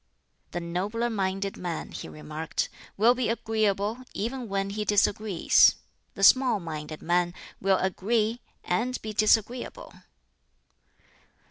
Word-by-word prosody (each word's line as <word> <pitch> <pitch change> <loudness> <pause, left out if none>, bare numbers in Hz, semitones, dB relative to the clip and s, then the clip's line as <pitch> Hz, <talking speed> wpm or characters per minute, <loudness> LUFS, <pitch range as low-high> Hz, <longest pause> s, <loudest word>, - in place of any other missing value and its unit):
"The 175 - -4
nobler 200 +8 -2
minded 195 -1 -2
man," 175 -3 -4
he - - -7
remarked, 155 +1 -4 0.3
"will 225 +4 +5
be 250 -2 -1
agreeable 220 -1 0 0.2
even 240 +2 -3
when 195 0 -1
he 210 +1 -2
disagrees; 205 -2 +4 0.4
the 195 - -4
small 255 0 +6
minded 155 -2 -7
man 175 +1 +1 0.3
will 195 0 +3
agree 220 +5 0 0.2
and 245 +8 -1
be 215 0 -4
disagreeable." 220 +3 +1
200 Hz, 115 wpm, -27 LUFS, 180-225 Hz, 0.4 s, small